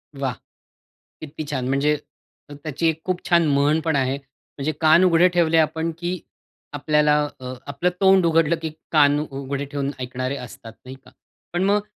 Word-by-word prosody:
वाह! 135 -3 -2 0.9
किती 155 0 -7
छान 130 -3 -2
म्हणजे 145 +2 +2 0.6
त्याची 145 +2 -3
एक 160 0 -3
खूप 185 -1 -1
छान 170 -2 +4
म्हण 145 +2 +2
पण 160 -3 +1
आहे, 135 0 0
म्हणजे 140 +2 -7
कान 160 +3 +6
उघडे 175 -1 +5
ठेवले 170 -2 +2
आपण 160 +1 +1
की 175 +1 -3 0.5
आपल्याला 150 +1 +2 0.2
अ, 130 0 -6
आपलं 140 +5 0
तोंड 190 -2 +5
उघडलं 165 0 +3
की 160 - -3 0.2
कान 145 -2 +4
उघडे 140 0 -4
ठेवून 140 0 -3
ऐकणारे 130 +2 -3
असतात 115 -2 -10
नाही 130 +1 -8
का, - - -17 0.4
पण 175 +1 0
मग 205 +2 +2
150 Hz, 160 wpm, -22 LUFS, 140-165 Hz, 0.9 s, कान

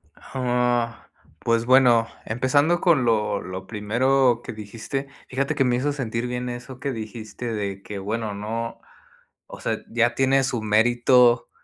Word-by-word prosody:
Ah, 125 -2 -1 0.3
pues 115 0 +1
bueno, 125 -3 +5 0.2
empezando 145 +9 +2
con 160 -8 +4
lo 105 -3 +1
lo 95 +1 -7
primero 120 +4 +2
que - - -6
dijiste, 115 +6 -5 0.2
fíjate 140 +3 -1
que 135 - +3
me 125 -2 +2
hizo 140 +4 0
sentir 120 -4 -3
bien 125 0 -3
eso 125 +1 -8
que 140 -1 -2
dijiste, 110 +1 -6
de 100 -3 -3
que 100 0 -7
bueno, 105 +2 -3
no, 115 +3 -4 0.7
o - - -10
sea, - - -1
ya 120 +1 +2
tiene 135 +1 +3
su 125 -4 -1
mérito 120 +3 +4
120 Hz, 150 wpm, -24 LUFS, 110-130 Hz, 0.7 s, bueno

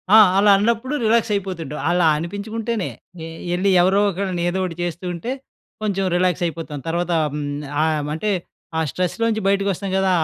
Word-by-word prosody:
ఆ! - - +10 0.2
అలా 205 +1 +6
అన్నప్పుడు 235 +6 0
రిలాక్స్ 225 0 +3
అయిపోతుంటాం. 175 -7 -4
అలా 175 0 +3
అనిపించుకుంటేనే. 210 +5 -3 0.4
ఏ - - -6 0.3
ఏళ్ళి 185 +3 +1
ఎవరో 190 +3 +4
ఒకళ్ళని, 185 -2 -2
ఏదో 190 +2 -2
ఒటి 170 - -5
చేస్తూ 175 +1 -4
ఉంటే, 175 +9 -4 0.5
కొంచెం 195 -2 0
రిలాక్స్ 180 -1 +1
అయిపోతాం. 165 -3 -4
తర్వాత, 175 +1 -1 0.2
హ్మ్. 150 0 -3 0.4
ఆయమ్ 155 -2 0
అంటే, 210 +5 -1 0.5
ఆ - - +2
స్ట్రెస్‌లో 180 +5 -2
నుంచి 220 -2 -1
బయటికి 200 0 +2
వస్తాం 195 +2 -5
కదా! 190 0 +2
190 Hz, 165 wpm, -21 LUFS, 170-205 Hz, 0.5 s, ఆ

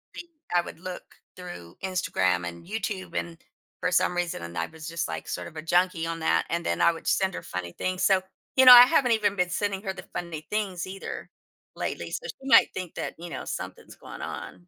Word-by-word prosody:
think 345 - -8 0.3
I 175 - +5
would 170 - -10
look 180 +1 -6 0.3
through 175 - -10
Instagram 90 - 0
and 85 0 -8
YouTube, 205 -1 -4
and 170 -1 -4 0.4
for 180 0 +1
some 180 0 +2
reason 175 - -2
and 85 0 -7
I 85 - -1
was 160 -1 -10
just, 170 0 -2
like, - - -5
sort - - -4
of 160 - -12
a - - -3
junkie 175 +1 +2
on 165 0 -3
that, 160 - +2
and 170 0 -2
then 85 - 0
I - - +6
would 165 - -10
send 190 -1 +2
her - - -6
funny 90 -1 -5
things, 185 0 -2
so, 190 -1 +4 0.3
you 260 - +6
know, 250 - +13
I 245 0 +12
haven't 260 -3 +3
even 210 -2 +1
been 180 -2 +1
sending 195 +1 -1
her 190 -2 -2
the 190 - -9
funny 170 -3 -4
things 200 -5 -2
either 195 +1 -7 0.5
lately, - - -4
so 480 - -4
she 270 - -9
might - - +7
think 185 -2 -6
that, - - -4
you 170 +1 -8
know, - - -5
something's - - -6
going - - -10
on. 90 -1 -7
180 Hz, 225 wpm, -27 LUFS, 160-190 Hz, 0.5 s, know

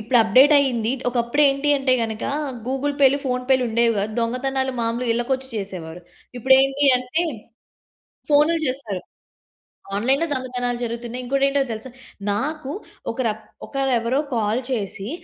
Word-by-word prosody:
ఇప్పుడు 235 +3 +2
అప్డేట్ 255 +7 +6
అయ్యింది. 245 -5 +1 0.2
ఒకప్పుడు 240 +4 +1
ఏంటి 275 +2 0
అంటే, 270 -1 +1
గనక 220 -1 -3 0.4
గూగుల్ 270 +2 -1
పేలు, 275 0 +5
ఫోన్ 250 0 -1
పేలు 260 -1 +4
ఉండేవి 230 0 +2
కాదు. 210 +2 -2
దొంగతనాలు 265 +3 -1
మామూలుగా 230 +1 -1
ఇళ్ళకొచ్చి 260 +2 -1
చేసేవారు. 180 -4 -6 0.4
ఇప్పుడేంటి 270 +3 +4
అంటే 255 +7 -1 1.1
ఫోనులు 305 +3 +4
చేస్తారు. 230 -8 -3 1.0
ఆన్‌లైన్‌లో 270 +9 +2
దొంగతనాలు 250 -2 -2
జరుగుతున్నాయి. 235 +2 -5
ఇంకోటెంటో 275 +2 +2
తెలుసా! 220 +4 -7 0.4
నాకు 285 +5 -3 0.4
ఒక‌ర 240 +1 -1 0.4
ఒక‌రేవరో 265 -1 0 0.2
కాల్ 220 +2 0
చేసి, 200 -3 -3
250 Hz, 120 wpm, -22 LUFS, 230-270 Hz, 1.1 s, అప్డేట్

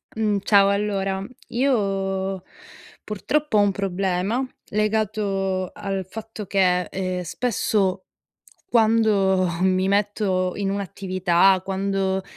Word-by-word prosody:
Mhmm, 215 -2 +1
ciao 200 -2 +5
allora 195 -1 -1 0.2
io 195 -7 0 0.6
purtroppo 250 +5 -1
ho 205 - +6
un 205 - +3
problema 195 +4 -1 0.2
legato 205 -3 -1
al 195 -2 -4
fatto 220 +1 -7
che, 185 -2 +2
ehm, 185 0 -3
spesso 195 -2 -1 0.7
quando 215 -5 +3
mi 185 0 +2
metto 200 -2 0
in 200 -1 -1
un'attività, 190 -1 +2
quando 195 0 -1
195 Hz, 95 wpm, -23 LUFS, 190-210 Hz, 0.7 s, ho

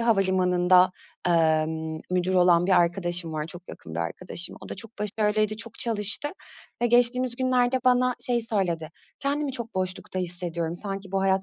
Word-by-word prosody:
havalimanında, 185 -4 +3 0.4
emm, 160 -1 +1
müdür 185 +1 0
olan 175 -1 +4
bir 190 - +2
arkadaşım 175 -1 -1
var, 155 0 -3
çok 175 +1 -10
yakın 80 - -10
bir 85 - -2
arkadaşım. 175 - -4
O - - -11
da - - -5
çok 225 - -7
başarılıydı, 215 0 0
çok 230 0 -5
çalıştı 220 +4 +2 0.5
ve - - +4
geçtiğimiz 245 +1 +3
günlerde 255 0 +2
bana 250 0 +3
şeyi 240 -2 +1
söyledi, 175 -8 -1 0.3
"Kendimi 285 0 -1
çok 235 -4 -5
boşlukta 185 0 -2
hissediyorum, 170 -2 -2
sanki 195 0 -4
bu 195 - +1
hayat 190 0 +2
190 Hz, 160 wpm, -25 LUFS, 175-230 Hz, 0.5 s, olan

